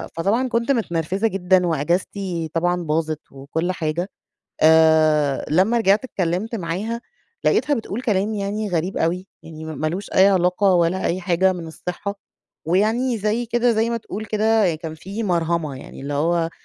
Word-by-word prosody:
فطبعًا 210 +10 +1
كنت 235 +4 +1
متنرفزة 190 - 0
جدًا 185 -2 +2
وأجازتي 170 +2 -1
طبعًا 175 +1 0
باظت 155 0 -1
وكل 150 +6 -3
حاجة. 170 +2 -2 0.5
آآ، 155 -3 +4
لمّا 190 +9 +3
رجعت 210 +1 +3
اتكلّمت 190 +2 -2
معاها، 205 +6 -3 0.4
لقيتها 295 - +2
بتقول 225 -1 -4
كلام 210 -2 0
يعني 205 +1 -2
غريب 175 +2 -1
أوي، 180 +4 -1 0.2
يعني 160 -1 -9
مالوش 160 +5 -3
أي 190 +1 +7
علاقة 185 +1 +3
ولا 175 +2 +1
أي 180 +2 -1
حاجة 185 +1 +2
من 170 -2 -7
الصحة. 180 +5 -5 0.5
ويعني 225 +8 +1
زي 215 +3 -1
كده 240 +1 +2
زي 225 +1 +1
ما 235 - -1
تقول 215 -1 -7
كده 215 -4 +2
كان 160 0 -7
في 195 +8 -6
مَرهَمة، 170 -5 0
يعني - - -11
اللي 140 +1 -4
هو 165 +3 +1
180 Hz, 150 wpm, -22 LUFS, 165-210 Hz, 0.5 s, أي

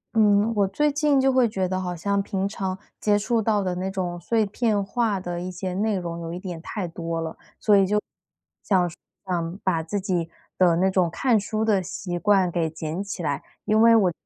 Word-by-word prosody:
嗯， 210 0 +4
我 200 -2 +3
最 295 +10 +1
近 290 -1 +2
就 265 0 +3
会 255 -3 +4
觉 190 -3 -1
得 185 +1 -2
好 180 -1 -3
像 200 +4 0
平 195 -1 -2
常 190 -2 -3 0.2
接 205 -1 +3
触 225 +2 +1
到 210 -2 +1
的 185 -1 -1
那 185 +2 -2
种 180 -3 -3
碎 220 +5 +1
片 210 0 0
化 215 -1 0
的 175 -1 -4
一 180 - -4
些 185 0 -4
内 210 +3 0
容 170 -2 -4
有 165 0 -5
一 175 - -4
点 180 -4 -6
太 185 +2 -4
多 165 0 -4
了， 160 -1 -4 0.2
所 210 - +4
以 195 -1 +5
就 210 +2 +2 0.6
想 185 -3 +2
说 170 - -9 0.3
想 175 -1 -2
把 175 -4 +1
自 185 +6 -3
己 180 -4 -1 0.3
的 175 -3 +4
那 185 +3 +3
种 185 -2 +2
看 230 +6 +2
书 215 +2 -2
的 205 -4 +3
习 175 0 -5
惯 195 -3 +3
给 165 -2 0
捡 160 +3 -4
起 200 -3 -6
来， 145 -3 -1 0.2
因 215 +1 +3
为 230 0 +7
我， 190 -5 +4
190 Hz, 235 characters per minute, -24 LUFS, 175-210 Hz, 0.6 s, 为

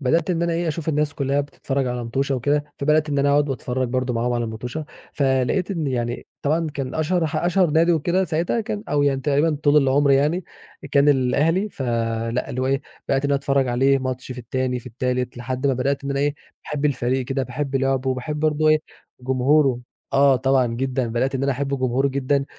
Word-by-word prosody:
بدأت 165 +7 +1
إن 170 -1 0
أنا 170 0 0
أشوف 160 +1 -3
الناس 150 -1 0
كلّها 140 0 0
بتتفرج 140 -1 -3
على 125 -1 -3
موتُشة 135 +4 -1
وكده، 145 +4 0
فبدأت 150 +2 +2
إن 145 -1 0
أنا 140 0 +3
أقعد 145 0 +3
وأتفرّج 130 -1 -2
برضو 130 0 -1
معاهم 120 +1 0
على 120 -1 0
الموتُشة. 120 +7 -5 0.3
فلقيت 135 +7 +1
إن 165 -6 -2
يعني 120 -2 -2 0.2
طبعًا 160 +3 +1
كان 135 -2 -4
أشهر 165 +2 +1
ح 155 +1 -3
أشهر 175 +1 +2
نادي 165 +3 +4
وكده 175 +4 +1
ساعتها 170 +7 0
كان 215 -2 -4
أو 145 0 +2
يعني 135 -2 +1
تقريبًا 145 +3 +1
طول 145 0 +4
العمر 140 0 +4
يعني، 150 +6 +2 0.5
كان 140 0 +5
الأهلي. 150 +9 +2
فلأ، 115 -3 -2
اللي 130 - -3
هو 130 - 0
إيه، 135 +1 0 0.3
بدأت 135 +1 +1
إن 140 - +1
أنا - - +3
أتفرّج 135 -1 +1
عليه، 135 +3 +3
ماتش 130 -1 -4
في 125 - -9
التاني 125 +1 -2
في 120 - -13
التالت، 125 +1 -2
لحد 130 +3 -3
ما 135 - +3
بدأت 140 +2 -1
إن 140 - -3
أنا 140 0 0
إيه، 145 0 +1 0.3
باحب 150 0 -4
الفريق 130 -2 0
كده، 135 +1 -2
باحب 135 +2 -3
لعبه، 135 0 0
وباحب 150 +4 -3
برضو 155 0 +2
إيه 155 - +5 0.4
جمهوره. 130 +1 +2 0.3
آه، 140 -1 +5
طبعًا 130 0 +2
جدًا، 125 +1 -1
بدأت 125 +4 -1
إن 135 - -1
أنا 140 0 +2
أحب 140 +1 -2
جمهوره 130 +2 +1
جدًا، 140 +1 0
135 Hz, 205 wpm, -22 LUFS, 130-150 Hz, 0.5 s, كان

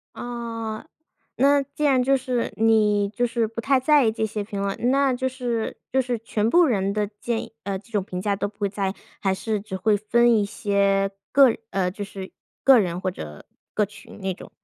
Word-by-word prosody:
啊， 230 -1 -5 0.5
那 280 +1 +4
既 280 +2 -5
然 265 -3 +4
就 270 +2 +3
是， 250 -2 -2
你 210 -2 +3
就 240 +3 -1
是 230 -2 0
不 225 +1 -6
太 275 +1 +3
在 285 +1 +4
意 220 - +3
这 220 0 -1
些 210 -1 -4
评 200 -1 -5
论， 200 0 -1
那 275 -1 +3
就 260 +1 -1
是 245 -3 -3 0.2
就 265 0 +3
是 245 -2 -2
全 220 -1 -1
部 350 +5 +6
人 200 -6 +1
的 210 0 0
建 235 -2 -1
议， - - -15
呃 195 -1 -3
这 210 +4 -19
种 205 -2 +1
评 180 -1 -5
价 200 0 0
都 200 - -2
不 205 - -20
会 205 -2 0
在 195 -1 -2
意， - - -7 0.3
还 195 -2 +1
是 210 +2 -2
只 200 -2 -6
会 205 +2 +2
分 235 +3 +3
一 210 - +3
些， 200 -1 +1 0.2
个 275 -1 +7
人 - - -1
呃， 190 -2 0
就 205 - -7
是 195 -1 -7 0.3
个 265 -3 +7
人 180 -3 -2
或 190 - -2
者 75 - -9 0.3
个 210 - +1
群 210 - -14
那 190 -1 -2
种？ - - -12
220 Hz, 240 characters per minute, -24 LUFS, 200-245 Hz, 0.5 s, 个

